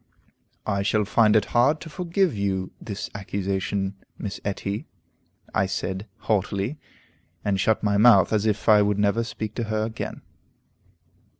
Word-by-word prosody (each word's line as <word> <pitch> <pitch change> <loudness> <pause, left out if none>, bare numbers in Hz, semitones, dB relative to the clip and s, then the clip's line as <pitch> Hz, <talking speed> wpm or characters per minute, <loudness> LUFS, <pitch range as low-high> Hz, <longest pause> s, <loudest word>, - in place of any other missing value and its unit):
I 100 0 0
shall 105 +1 +1
find 110 +1 +4
it 110 - +4
hard 135 +6 +4
to - - -8
forgive 180 - 0
you 95 -2 -1
this 105 -3 -5
accusation, 95 0 -2 0.2
Miss 100 -3 -5
Etty," 100 +1 -3 0.7
I 95 - +2
said, 95 +2 -3
haughtily, 105 +5 -1 0.7
and 100 -2 +1
shut 110 +3 +2
my 100 -1 +2
mouth 110 -2 +6
as 110 0 +2
if 105 -1 -1
I 105 -2 +7
would 105 0 +2
never 105 +3 +2
speak 110 -2 -5
to 120 - -1
her 110 0 -1
again. 110 0 -6
105 Hz, 145 wpm, -25 LUFS, 100-110 Hz, 0.7 s, I